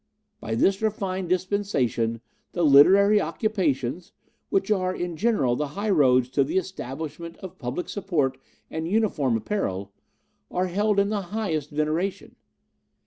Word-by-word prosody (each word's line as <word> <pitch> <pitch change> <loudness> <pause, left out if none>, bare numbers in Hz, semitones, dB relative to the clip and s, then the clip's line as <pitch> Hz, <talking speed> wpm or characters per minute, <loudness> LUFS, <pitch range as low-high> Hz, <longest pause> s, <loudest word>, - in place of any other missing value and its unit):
By 110 - -3
this 195 - +2
refined 190 -4 -2
dispensation 170 - 0 0.3
the 175 - 0
literary 195 +9 +6
occupations, 165 - -1 0.4
which 195 +2 0
are 185 -2 +1
in 175 -1 -4
general 175 - +1
the 150 +3 -2
highroads 140 - +3
to 140 +2 +2
the 140 - -2
Establishment 165 -2 -5
of 190 -3 -10
Public 135 +7 -4
Support 165 -10 -1 0.3
and 160 +1 -3
Uniform 170 - +1
Apparel, 100 - -3 0.6
are 180 +1 0
held 205 +3 0
in 200 0 +2
the 210 -1 -1 0.2
highest 160 -9 -2
veneration. 155 +6 -2
175 Hz, 130 wpm, -25 LUFS, 140-200 Hz, 0.6 s, literary